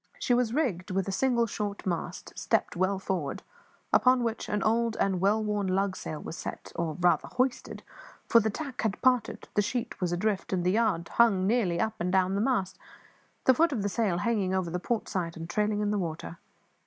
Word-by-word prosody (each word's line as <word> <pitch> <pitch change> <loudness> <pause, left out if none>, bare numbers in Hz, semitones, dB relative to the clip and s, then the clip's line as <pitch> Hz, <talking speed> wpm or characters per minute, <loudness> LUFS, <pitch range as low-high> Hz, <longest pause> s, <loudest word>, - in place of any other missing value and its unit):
She 245 - +1
was 240 -2 +2
rigged 230 - -1
with 190 0 -1
a - - -1
single 235 +3 +2
short 205 -2 -4
mast, 175 -3 -4
stepped - - 0
well 185 +2 +1
forward, 185 -7 -3 0.5
upon 255 -1 +5
which 230 -1 -3
an 210 -1 0
old 230 +1 +1
and 190 -2 +1
well 210 +3 +3
worn 210 -2 -1
lugsail 185 -4 -1
was - - -6
set - - -7
or, 165 -2 -2
rather, 175 0 +3
hoisted 255 0 -1 0.4
for 230 - +6
the 220 -1 +1
tack 275 +3 -5
had 220 -4 -1
parted, 250 -2 +2
the 210 - +3
sheet 235 +2 -3
was 180 -1 0
adrift, 195 +2 -1
and 180 -2 0
the 180 - +2
yard 205 -6 +1
hung 205 -6 +3
nearly 195 -6 +1
up 220 -1 0
and 180 +1 -1
down 190 0 +2
the 200 - 0
mast, 195 -7 0 0.6
the 260 - +6
foot 330 +5 +3
of 230 -8 -1
the 205 - 0
sail 200 -4 0
hanging 195 -1 0
over 180 -3 -1
the 180 - -2
port 230 +4 -2
side 170 -3 -3
and 165 0 -6
trailing 210 +3 0
in 210 0 0
the 210 - 0
water. 165 -1 -5
200 Hz, 205 wpm, -28 LUFS, 185-230 Hz, 0.6 s, for